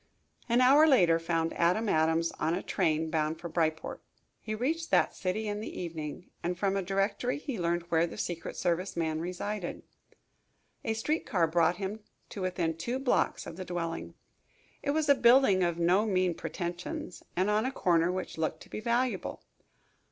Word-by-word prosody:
An 240 +2 +4
hour 280 +5 +7
later 175 - +5
found 165 0 -1
Adam 180 +7 +2
Adams 160 -1 +2
on 165 +2 +1
a 185 - -4
train 160 -3 0
bound 155 0 0
for 170 - -5
Bryport. 160 -1 -1 0.4
He 215 0 -4
reached 320 +9 -1
that - - +3
city 205 +4 -2
in 205 0 -2
the 215 - -6
evening, 160 -1 -6
and 175 +1 -2
from 195 +1 +1
a 195 - +1
directory 195 +6 0
he 275 -7 -5
learned 170 0 0
where 165 +1 +3
the - - -9
secret 170 -2 -4
service 180 +1 -1
man 160 -1 0
resided. 180 +3 -4 1.0
A 225 - -1
street 300 +9 -1
car 175 -5 +2
brought 165 +1 +2
him 200 +2 -4 0.3
to 200 - -6
within 175 -3 -1
two 240 +10 -3
blocks 265 -1 +1
of 165 - -8
the 190 - -4
dwelling. 170 -2 -4 0.7
It 285 - -3
was 305 +1 +1
a 285 - +8
building 240 -6 +5
of 170 -2 +1
no 180 +6 +3
mean 185 -3 +2
pretentions 175 +1 -5
and 185 +2 +2
on 210 +1 +2
a - - -2
corner 170 -7 +2
which 185 -3 -5
looked 160 0 -1
to - - -18
be - - -4
valuable. 240 +3 -1
180 Hz, 180 wpm, -30 LUFS, 165-215 Hz, 1.0 s, a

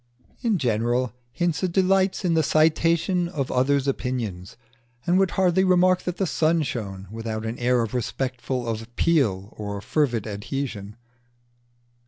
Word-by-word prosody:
In 230 -5 +1
general, 120 -2 0 0.2
Hinze 175 +4 0
delights 190 +1 +2
in 170 - +2
the 160 - +4
citation 165 +4 +2
of 140 -7 -3
opinions, 125 -8 -1 0.5
and 180 +2 +3
would 195 -1 +3
hardly 190 0 +3
remark 185 0 +4
that 180 -1 -3
the 195 - +1
sun 160 -1 +2
shone 100 -7 -5
without 110 0 -4
an 115 +2 -4
air 125 0 +2
of 110 - -5
respectful 125 0 -2
appeal 115 - 0
or 100 -1 -5
fervid 120 0 0
adhesion. 105 -1 -5
130 Hz, 130 wpm, -24 LUFS, 115-170 Hz, 0.5 s, the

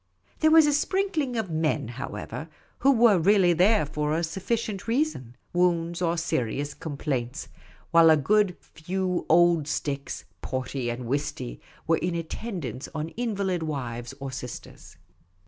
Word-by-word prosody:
There 315 - +5
was 320 -1 +7
a 295 - +2
sprinkling 310 -4 0
of 220 -6 -2
men, 155 -5 0
however, 140 +5 -6 0.3
who 275 - +5
were 230 -6 +5
really 185 0 +5
there 185 +1 +4
for 150 +1 -1
a 170 - 0
sufficient 195 +4 -2
reason 230 - -1
— - - -41
wounds 175 -1 +1
or 170 -1 +1
serious 145 -2 -1
complaints; 140 -3 -4 0.4
while 165 -1 +7
a 160 - +7
few 185 +1 0
good 175 - -2
old 170 -2 +5
sticks, 140 -2 -3 0.2
porty 130 -1 -3
and 120 +1 -5
whisty, 120 - -3 0.2
were 165 0 +3
in 175 -1 -2
at 165 -1 -4
tendance 160 - -5
on 155 +1 -3
invalid 200 -5 -2
wives 125 -5 -4
or 135 -1 -5
sisters. 125 -2 -9
165 Hz, 145 wpm, -26 LUFS, 140-200 Hz, 0.4 s, was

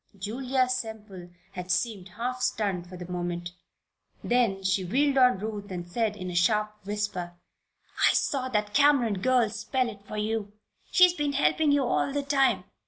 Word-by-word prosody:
Julia 255 +6 0
Semple 220 -7 -5 0.2
had 180 -1 -7
seemed 195 -2 -1
half 250 +2 -3
stunned 205 -8 -1
for 180 - -9
the 175 -1 -8
moment. 175 -1 -4 0.7
Then 230 -6 +1
she 190 0 +1
wheeled 270 +8 +2
on 250 -5 +5
Ruth 210 0 -5
and 175 -2 -6
said, 215 +3 -1
in 185 -2 -5
a - - -6
sharp 210 +4 +2
whisper: 200 -4 -3 0.7
"I - - +3
saw 260 -2 0
that 210 -3 -1
Cameron 270 -8 +4
girl 250 0 +3
spell 235 +4 -1
it 205 -3 -10
for 215 - -6
you! 210 -1 -2 0.4
She's 360 -1 +6
been 295 -4 -1
helping 285 - +2
you 285 -1 +3
all 255 +2 0
the 285 0 -1
time! 275 -1 +2
215 Hz, 170 wpm, -27 LUFS, 190-255 Hz, 0.7 s, She's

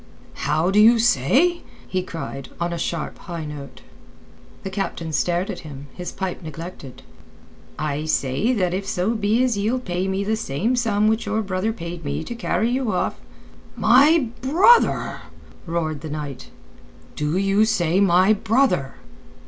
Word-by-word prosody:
"How 160 +5 +2
do 205 - +4
you 230 +3 +7
say?" 245 - +3 0.3
he 185 - -1
cried, 165 -6 -7
on 170 0 -1
a - - -3
sharp, 170 +1 -3
high 170 -4 -6
note. 145 -2 -9 0.8
The 190 - -5
captain 170 -4 -3
stared 175 +4 0
at - - -7
him, 145 -3 -10
his 180 -1 -6
pipe 190 -1 -4
neglected. 160 -4 -9 0.7
"I 150 0 -2
say 155 - 0
that 185 -6 0
if 195 +1 -3
so 195 +3 0
be 220 +2 +1
as 240 -5 +1
ye'll 220 +5 +1
pay 185 -6 -2
me 190 +1 -1
the 215 +2 0
same 220 - -1
sum 215 -4 +1
which 220 0 0
your 215 +1 0
brother 190 +2 -1
paid 170 -5 -7
me 145 +2 -3
to 240 - -6
carry 235 0 0
you 255 -3 0
off...." - - -2 0.6
"My 280 +1 +5
brother?" 350 - +4 0.5
roared 160 -3 -2
the 160 - -6
knight. 145 -3 -6 0.7
"Do 150 +3 -1
you 195 +2 +3
say 185 -5 +1
my 190 +1 +5
brother?" 215 - +1
190 Hz, 155 wpm, -22 LUFS, 160-220 Hz, 0.8 s, you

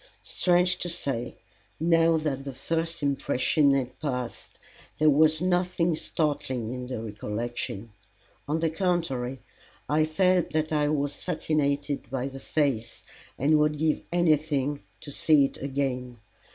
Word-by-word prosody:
Strange 180 0 +2
to 175 - -3
say, 130 -7 -2 0.4
now 165 0 +4
that 145 -4 -2
the 135 -1 -6
first 165 +3 -2
impression 140 +1 +2
had 130 -2 -3
passed, 125 -5 -4 0.4
there 155 0 +5
was 155 +2 +4
nothing 180 -2 +1
startling 130 -7 -2
in 125 -1 -5
the 125 -3 -4
recollection; 110 0 -4 0.6
on 155 +2 0
the 165 -1 +1
contrary, 160 -8 -1 0.5
I 155 +1 +3
felt 180 +2 +2
that 155 0 0
I 150 -1 +2
was 145 -1 -2
fascinated 145 -5 -1
by 135 +1 -2
the 135 0 -9
face, 135 -7 -1 0.3
and 150 +3 +3
would 150 0 +2
give 155 0 +1
anything 150 -4 +1 0.2
to 145 - -7
see 145 0 +4
it - - -5
again. 130 -3 -3
145 Hz, 135 wpm, -27 LUFS, 130-160 Hz, 0.6 s, there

